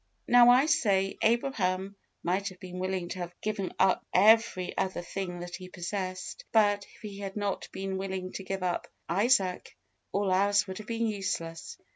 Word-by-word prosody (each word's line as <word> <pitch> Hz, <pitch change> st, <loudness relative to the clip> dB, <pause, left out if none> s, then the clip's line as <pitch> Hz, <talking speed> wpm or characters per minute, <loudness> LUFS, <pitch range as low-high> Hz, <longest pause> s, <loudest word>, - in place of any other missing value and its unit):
Now, 245 Hz, 0 st, +7 dB
I 255 Hz, +3 st, +6 dB
say, 195 Hz, -11 st, +2 dB
Abraham 200 Hz, -5 st, +1 dB, 0.3 s
might 190 Hz, +4 st, 0 dB
have 185 Hz, -1 st, -14 dB
been 180 Hz, -1 st, -8 dB
willing 185 Hz, -1 st, -2 dB
to 185 Hz, -, -5 dB
have 175 Hz, 0 st, -6 dB
given 205 Hz, -3 st, -2 dB
up 190 Hz, -, +3 dB
every 210 Hz, -2 st, +4 dB
other 185 Hz, -2 st, -1 dB
thing 180 Hz, -1 st, -5 dB
that 175 Hz, 0 st, -6 dB
he 185 Hz, -1 st, -10 dB
possessed; 185 Hz, -, -5 dB
but, 205 Hz, -2 st, +3 dB
if -, -, -20 dB
he 200 Hz, -2 st, -7 dB
had 195 Hz, -1 st, -5 dB
not 205 Hz, -2 st, -2 dB
been 190 Hz, 0 st, -3 dB
willing 190 Hz, -1 st, -4 dB
to 195 Hz, -, -6 dB
give 190 Hz, 0 st, -4 dB
up 180 Hz, -1 st, -1 dB, 0.2 s
Isaac, 195 Hz, 0 st, +1 dB, 0.3 s
all 200 Hz, -1 st, +1 dB
else 200 Hz, +2 st, +3 dB
would 190 Hz, 0 st, -6 dB
have 215 Hz, -, -9 dB
been 230 Hz, 0 st, -1 dB
useless. 170 Hz, -6 st, -3 dB
195 Hz, 175 wpm, -29 LUFS, 185-205 Hz, 0.3 s, Now